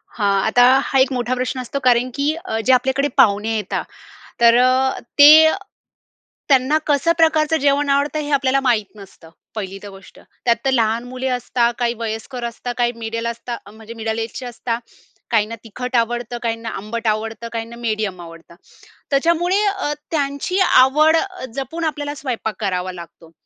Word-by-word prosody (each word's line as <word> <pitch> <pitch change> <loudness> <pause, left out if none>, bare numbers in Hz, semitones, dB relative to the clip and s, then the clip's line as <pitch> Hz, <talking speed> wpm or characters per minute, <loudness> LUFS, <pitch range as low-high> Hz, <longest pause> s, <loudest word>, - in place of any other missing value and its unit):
हां. 200 -3 +1
आता 245 +2 +4 0.3
हा 270 - +2
एक 260 +1 +3
मोठा 245 0 -1
प्रश्न 255 +1 -3
असतो 255 +3 -4
कारण 245 +1 +3
की 290 +2 +1
अ, 220 - -2
जे 260 - +5
आपल्याकडे 265 +2 +2
पाहुणे 215 +2 +2
येता 210 -3 -2 0.6
तर 235 0 +6
अ, 255 +1 +2 0.2
ते 310 +2 +9 1.0
त्यांना 270 +2 +3
कसं 295 +3 +2
प्रकारचं 320 -1 +3
जेवण 285 0 +2
आवडतं 285 +2 +1
हे 295 0 -5
आपल्याला 275 -1 +2
माहीत 235 -6 +1
नसतं, 195 -5 -15 0.3
पहिली 195 -2 -5
तर 205 - -8
गोष्ट. 195 -1 -15 0.2
त्यात 235 -1 +3
तर - - +4
लहान 230 -2 +1
मुली 255 +1 -4
असतात, 245 -1 0
काही 240 -1 0
वयस्कर 230 +2 -5
असतात, 235 +1 -5
काही 240 0 +1
मिडल 230 0 -4
असतात, 235 -2 -6
म्हणजे 220 +2 -12
मिडल 220 0 -3
एजचे 230 +3 -6
असता. 235 -1 -4 0.5
काहींना 225 0 +1
तिखट 250 +3 -4
आवडतं, 240 0 -1
काहींना 230 -1 -3
आंबट 225 +3 -5
आवडतं, 220 +2 -3
काहींना 230 0 -5
मिडीयम 215 -5 -3
आवडतं. 165 0 -13 0.6
त्याच्यामुळे 340 +7 +2
अ, 385 -7 -1 0.2
त्यांची 285 +5 -1
आवड 305 -1 +5 0.4
जपून 275 +5 -4
आपल्याला 290 -2 -3
स्वयंपाक 240 -6 -4
करावा 185 -2 -2
लागतो. 170 -1 -12
240 Hz, 160 wpm, -19 LUFS, 225-275 Hz, 1.0 s, ते